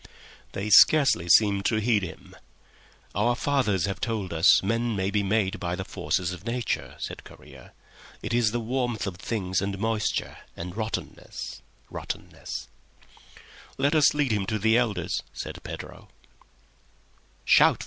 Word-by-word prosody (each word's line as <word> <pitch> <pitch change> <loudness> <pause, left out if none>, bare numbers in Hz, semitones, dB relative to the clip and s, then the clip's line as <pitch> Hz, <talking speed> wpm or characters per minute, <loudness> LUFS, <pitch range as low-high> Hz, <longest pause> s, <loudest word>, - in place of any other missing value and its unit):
They 105 +2 -3
scarcely 135 - +6
seemed 100 +1 +5
to 115 - +2
heed 110 -1 +2
him. 90 -4 -9 0.8
"Our 120 +5 +2
fathers 125 - +1
have 100 -1 -4
told 105 -7 -2
us 80 +4 +5
men 115 +3 0
may 95 0 -1
be 105 0 +1
made 100 -1 0
by 90 -1 -2
the 95 0 -5
forces 90 -1 -2
of 90 0 -8
Nature," 120 +1 -3
said - - -6
Correa. - - -15 0.5
"It - - -3
is 120 -2 +3
the 120 +2 -2
warmth 120 -1 -2
of 95 -3 -5
things, 95 -2 -2
and 100 0 -2
moisture, 110 0 -1 0.2
and 90 +2 -6
rottenness—rottenness." 110 0 -6 1.1
"Let 140 +3 +2
us 150 -1 +5
lead 145 -4 +1
him 100 -3 0
to 110 - 0
the 110 +2 +3
elders," 105 -8 0
said - - -7
Pedro. - - -9
105 Hz, 140 wpm, -26 LUFS, 95-120 Hz, 1.1 s, scarcely